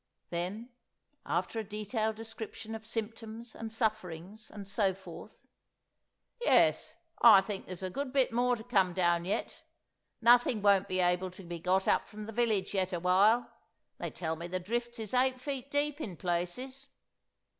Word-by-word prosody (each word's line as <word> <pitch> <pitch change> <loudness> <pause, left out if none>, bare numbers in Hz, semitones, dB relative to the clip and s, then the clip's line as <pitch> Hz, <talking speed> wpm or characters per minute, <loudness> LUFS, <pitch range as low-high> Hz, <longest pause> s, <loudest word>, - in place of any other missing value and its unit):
Then, 190 +8 -4 0.6
after 225 - -1
a - - -2
detailed 215 +1 -2
description 225 0 -7
of 220 0 -7
symptoms 225 0 -5
and 225 -1 -6
sufferings 215 -2 -3
and 200 -2 -9
so 195 -2 +1
forth—"Yes, 480 - -2 0.3
I 220 -5 +10
think 195 0 -6
there's 185 0 -6
a 185 - -3
good 275 +4 -3
bit 265 -3 +2
more 245 +1 +3
to 220 - -9
come 195 -7 +2
down 175 -1 +2
yet. 195 - -3 0.6
Nothing 240 -2 +5
won't 200 -1 +5
be 185 0 0
able 180 +1 +1
to 185 +2 -12
be 170 -1 -6
got 185 +3 +1
up - - +2
from 210 0 -8
the 225 - -7
village 215 -5 +1
yet 185 -2 0
awhile; 190 +7 +3 0.5
they - - -3
tell 160 -2 -3
me 170 +2 -6
the 185 +1 -2
drifts 235 +5 -3
is 220 -1 -4
eight 255 0 +2
feet 275 0 -5
deep 290 +1 0
in 190 - -5
places. 250 - -3
215 Hz, 160 wpm, -31 LUFS, 185-235 Hz, 0.6 s, I